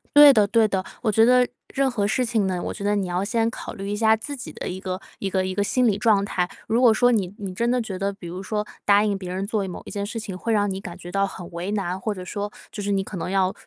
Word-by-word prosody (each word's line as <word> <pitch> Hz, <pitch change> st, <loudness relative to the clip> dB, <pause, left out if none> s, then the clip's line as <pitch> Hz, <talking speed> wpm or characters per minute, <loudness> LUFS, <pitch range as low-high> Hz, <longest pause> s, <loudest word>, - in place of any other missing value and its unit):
对 290 Hz, -1 st, +11 dB
的 215 Hz, -4 st, +5 dB
对 220 Hz, +1 st, +4 dB
的， 190 Hz, -2 st, -1 dB, 0.2 s
我 220 Hz, -, +1 dB
觉 225 Hz, +2 st, +5 dB
得 250 Hz, 0 st, +5 dB, 0.3 s
任 275 Hz, -1 st, +2 dB
何 210 Hz, -5 st, 0 dB
事 250 Hz, +4 st, +1 dB
情 225 Hz, -4 st, +1 dB
呢， 180 Hz, -2 st, -1 dB
我 -, -, -3 dB
觉 -, -, -7 dB
得 205 Hz, +1 st, +2 dB
你 195 Hz, -2 st, -1 dB
要 180 Hz, +1 st, -1 dB
先 225 Hz, +2 st, +1 dB
考 -, -, -7 dB
虑 195 Hz, 0 st, -6 dB
一 205 Hz, -, -1 dB
下 220 Hz, +1 st, +4 dB
自 285 Hz, +6 st, -6 dB
己 255 Hz, -, -8 dB
的 -, -, -6 dB
一 185 Hz, -, -5 dB
个 185 Hz, -1 st, -4 dB, 0.2 s
一 195 Hz, -, -2 dB
个 190 Hz, -1 st, 0 dB
一 185 Hz, -, -2 dB
个 205 Hz, -, +2 dB
心 250 Hz, +4 st, +2 dB
理 200 Hz, -, +2 dB
状 210 Hz, -2 st, +3 dB
态。 180 Hz, -3 st, -1 dB, 0.2 s
如 235 Hz, +3 st, +2 dB
果 235 Hz, -3 st, +7 dB
说 245 Hz, +2 st, +4 dB
你 195 Hz, -5 st, 0 dB
你 195 Hz, -2 st, -5 dB
真 235 Hz, +5 st, 0 dB
的 250 Hz, 0 st, +2 dB
觉 200 Hz, -4 st, -5 dB
得， 195 Hz, +1 st, -1 dB
比 195 Hz, -3 st, -10 dB
如 180 Hz, +2 st, -6 dB
说 210 Hz, +2 st, -2 dB, 0.2 s
答 205 Hz, 0 st, +5 dB
应 205 Hz, -2 st, 0 dB
别 185 Hz, -2 st, -6 dB
人 190 Hz, +1 st, -2 dB
做 210 Hz, -1 st, -1 dB
一 -, -, -5 dB
某 180 Hz, -, -7 dB
一 -, -, -8 dB
件 200 Hz, -1 st, -3 dB
事 225 Hz, +2 st, -5 dB
情， 195 Hz, -4 st, -6 dB
会 230 Hz, +4 st, -1 dB
让 205 Hz, -1 st, +2 dB
你 190 Hz, 0 st, -3 dB
感 175 Hz, -2 st, -8 dB
觉 175 Hz, 0 st, -9 dB
到 195 Hz, +1 st, +2 dB
很 180 Hz, -3 st, -8 dB
为 175 Hz, +3 st, -4 dB
难， 190 Hz, -3 st, -2 dB
或 210 Hz, +2 st, -2 dB
者 185 Hz, -2 st, -7 dB
说 205 Hz, +2 st, -4 dB, 0.2 s
就 205 Hz, -, -6 dB
是 205 Hz, -, -1 dB
你 195 Hz, -1 st, +1 dB
可 190 Hz, -, -7 dB
能 175 Hz, -, -3 dB
要 190 Hz, -1 st, +2 dB
200 Hz, 335 characters per minute, -24 LUFS, 190-220 Hz, 0.3 s, 对